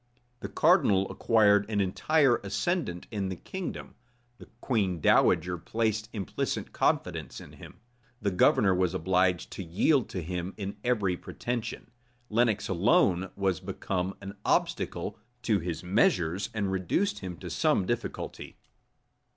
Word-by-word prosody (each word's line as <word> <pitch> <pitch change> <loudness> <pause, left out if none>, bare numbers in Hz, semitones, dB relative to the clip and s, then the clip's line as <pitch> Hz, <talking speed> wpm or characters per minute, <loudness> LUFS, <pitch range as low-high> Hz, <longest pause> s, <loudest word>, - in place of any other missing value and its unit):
The - - -6
cardinal 95 -1 +3
acquired 105 -2 +3
an 105 -2 0
entire 125 +7 +3
ascendant 100 - -2
in 100 -3 -2
the 95 - -3
kingdom: 190 - -6 0.5
the - - -12
queen 100 -9 0
dowager 90 +2 +3
placed 110 +2 -1
implicit 100 -5 -3
confidence - - -1
in - - -12
him: - - -13 0.4
the 100 -1 -1
governor 95 +1 +4
was 90 0 +1
obliged 90 0 +1
to 95 - -6
yield 110 - +2
to 90 - -4
him 90 +2 -4
in 100 -1 -5
every 105 -7 +1
pretension: 120 +4 -5 0.4
Lenox 110 -2 +2
alone 95 0 +2
was 95 -2 0
become 95 0 -3
an 100 +1 -8
obstacle 105 +2 -1 0.2
to 110 -4 +2
his 85 -1 -4
measures, 90 0 +1
and 100 -3 -2
reduced 95 - 0
him 90 -3 -6
to - - -8
some 95 - +2
difficulty. 120 +3 -4
100 Hz, 135 wpm, -28 LUFS, 90-110 Hz, 0.5 s, governor